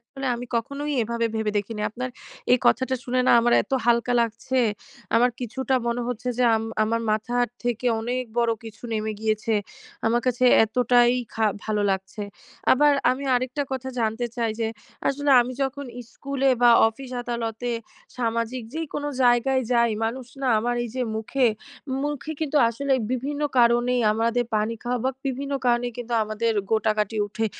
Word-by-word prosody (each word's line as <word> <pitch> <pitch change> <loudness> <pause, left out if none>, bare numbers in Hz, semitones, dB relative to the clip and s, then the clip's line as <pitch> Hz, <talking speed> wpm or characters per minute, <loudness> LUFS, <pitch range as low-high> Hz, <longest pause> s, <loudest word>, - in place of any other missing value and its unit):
আসলে 270 0 -4
আমি 245 - -7
কখনোই 280 +5 -3
এভাবে 230 +1 -1
ভেবে 220 -1 0
দেখি 205 +2 -4
নি। 210 - -3
আপনার 255 +3 -5 0.4
এই 250 - +6
কথাটা 260 0 +3
শুনে 255 0 0
না, - - +6
আমার 240 +1 +2
এত - - -15
হালকা 235 +1 +3
লাগছে, 230 +3 -2 0.6
আমার 245 +2 +4
কিছুটা 260 +2 -2
মনে 235 +1 -1
হচ্ছে 250 0 -4
যে 250 - +3
আম 220 - -2 0.2
আমার 230 +1 0
মাথার 240 +3 +1 0.2
থেকে 245 0 -1
অনেক 250 +3 -2
বড়ো 235 -1 +2
কিছু 225 -1 -11
নেমে 215 0 -1
গিয়েছে 220 0 0 0.5
,আমার 235 +1 +2
কাছে 255 0 +1 0.2
এতটাই 245 +1 +3 0.2
খা 220 -1 +2 0.2
ভালো 210 -1 0
লাগছে। 190 +2 -3 0.5
আবার 295 +2 +5 0.2
আমি 265 +2 -2
আরেকটা 255 +3 -1
কথা 265 0 -3
জানতে 225 +2 0
চাই 230 -2 0
যে, 225 - +1 0.4
আসলে 285 +1 0
আমি 245 +1 -2
যখন 280 +1 -3 0.3
স্কুলে 275 -1 0
বা 240 - +8 0.2
অফিস-আদালতে, 240 -1 -4 0.5
সামাজিক 230 +1 -1
যেইকোনো 300 -2 -3
জায়গায় 255 +2 +3
যাই, 235 -1 +4
মানুষ 245 +3 -3 0.2
না 260 - +1
আমার 240 +2 0
এইযে 245 +2 -3
মুখে, 245 +4 +1 0.6
মুখে 295 +1 -3
কিন্তু 300 -1 -1
আসলে 275 +4 -2 0.2
বিভিন্ন 285 +4 -2 0.2
কারণেই 240 +1 +4
আমাদের 230 +2 +1
পানি 215 +2 0
খাওয়া 245 +1 -1
বা 260 - +2 0.2
বিভিন্ন 275 +1 -3
কারণেই 240 0 +2
কিন্তু 245 0 -5
আমাদের 215 +2 -1 0.2
গোটাাগাটি 220 0 +1
উঠে। 220 +2 -2
240 Hz, 160 wpm, -24 LUFS, 225-260 Hz, 0.6 s, বা